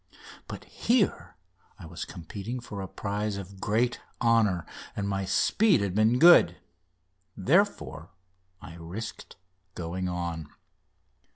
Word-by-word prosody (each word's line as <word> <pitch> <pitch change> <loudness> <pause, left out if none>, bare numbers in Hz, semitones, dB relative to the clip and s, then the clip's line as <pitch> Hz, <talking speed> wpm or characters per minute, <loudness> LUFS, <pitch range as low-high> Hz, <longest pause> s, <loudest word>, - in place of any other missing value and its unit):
But - - -7
here 185 - 0 0.4
I - - -11
was - - -6
competing 105 +8 -6
for 105 -4 -7
a 95 - -5
prize 105 +1 -3
of 95 0 -9
great 115 +4 0 0.2
honour, 110 -7 +3 0.3
and 100 -1 -2
my 95 -1 -1
speed 190 - +3
had 100 -3 -1
been 110 +4 +3
good. 160 - +7 0.8
Therefore 125 - +1 0.5
I 85 - -11
risked 95 +7 -7 0.4
going 90 +2 -3
on. 85 -3 -4
100 Hz, 115 wpm, -28 LUFS, 90-115 Hz, 0.8 s, good